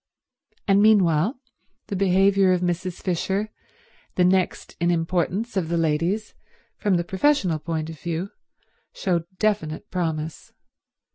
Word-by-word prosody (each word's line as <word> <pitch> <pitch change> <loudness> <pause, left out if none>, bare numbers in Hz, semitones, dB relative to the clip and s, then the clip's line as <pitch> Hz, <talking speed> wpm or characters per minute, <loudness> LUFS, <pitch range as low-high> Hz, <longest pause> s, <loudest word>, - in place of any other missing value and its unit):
And 200 0 +5
meanwhile 205 - +4 0.5
the 200 - -4
behaviour 195 0 +4
of 180 - 0
Mrs. 180 0 -2
Fisher, 190 +3 -1 0.7
the 180 - +3
next 185 0 +1
in 170 0 +2
importance 180 +6 -1
of 175 -4 -1
the 170 - 0
ladies 165 +7 0 0.4
from 205 -3 +1
the 175 - +1
professional 190 - +1
point 160 -1 -3
of 160 -2 -9
view, 170 +3 -3 0.6
showed 175 -3 -1
definite 205 -3 -1
promise. 160 -3 -3
180 Hz, 125 wpm, -24 LUFS, 165-195 Hz, 0.7 s, And